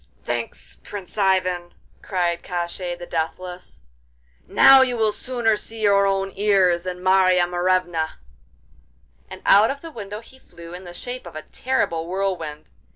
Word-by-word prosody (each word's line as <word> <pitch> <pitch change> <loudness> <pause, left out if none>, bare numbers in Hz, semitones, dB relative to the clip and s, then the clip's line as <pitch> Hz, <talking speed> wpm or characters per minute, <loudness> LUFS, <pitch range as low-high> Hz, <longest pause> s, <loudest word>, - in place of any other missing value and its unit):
'Thanks, - - -5
Prince 195 -4 -8
Ivan!' 185 -3 +1 0.3
cried 175 -3 -1
Koshchei 175 0 -4
the 175 - -8
Deathless, 175 - -5 0.6
'now 270 0 +8
you 250 -2 +1
will 220 -1 +2
sooner 235 -1 0
see 225 +2 -8
your 200 -2 +4
own 195 0 0
ears 190 -4 +3
than 180 0 -6
Marya 185 -1 +4
Morevna!' 175 -2 0 1.1
and - - -10
out 205 +3 +6
of 280 +1 -4
the 330 - -9
window 210 -5 -7
he 260 +3 -17
flew 170 -7 -13
in 180 +1 -9
the 175 - -9
shape 245 0 -6
of 170 - -11
a 155 - -6
terrible 170 -11 -1
whirlwind. 175 -5 -3
185 Hz, 150 wpm, -22 LUFS, 175-210 Hz, 1.1 s, now